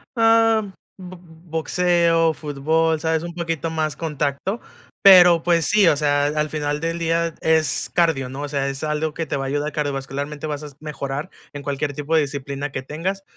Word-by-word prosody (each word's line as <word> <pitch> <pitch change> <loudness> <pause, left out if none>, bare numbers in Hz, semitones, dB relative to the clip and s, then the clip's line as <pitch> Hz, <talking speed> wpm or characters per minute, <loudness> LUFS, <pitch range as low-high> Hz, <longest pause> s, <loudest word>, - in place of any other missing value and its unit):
am, 225 -2 +3 0.3
bo 185 -1 -10
boxeo, 165 0 +1
fútbol, 155 +2 0
¿sabes?, 160 0 0
un 170 - -6
poquito 165 -2 -3
más 155 -2 -2
contacto, 150 - -2 0.4
pero 175 -4 +8
pues 170 -1 +2
sí, 210 -4 +4
o 150 - +5
sea, 145 -1 +2
a - - +2
al 150 0 -1
final 150 -1 -2
del 165 +1 -2
día 165 0 0
es 160 -4 +1
cardio, 165 -7 +2
¿no? 135 +2 -7
O - - -3
sea, 140 -1 -1
es 135 +1 -5
algo 150 0 -1
que 165 0 -4
te 140 - -2
va 135 - -3
a - - -3
ayudar 145 +2 -2
cardiovascularmente, 145 +1 -4
vas 150 0 -4
a 150 - -7
mejorar 150 +1 -5 0.2
en 145 - -7
cualquier 140 +1 -3
tipo 150 +3 -2
de 160 - +5
disciplina 140 0 -4
que 130 - -4
tengas, 185 +8 -4
155 Hz, 190 wpm, -21 LUFS, 145-170 Hz, 0.4 s, pero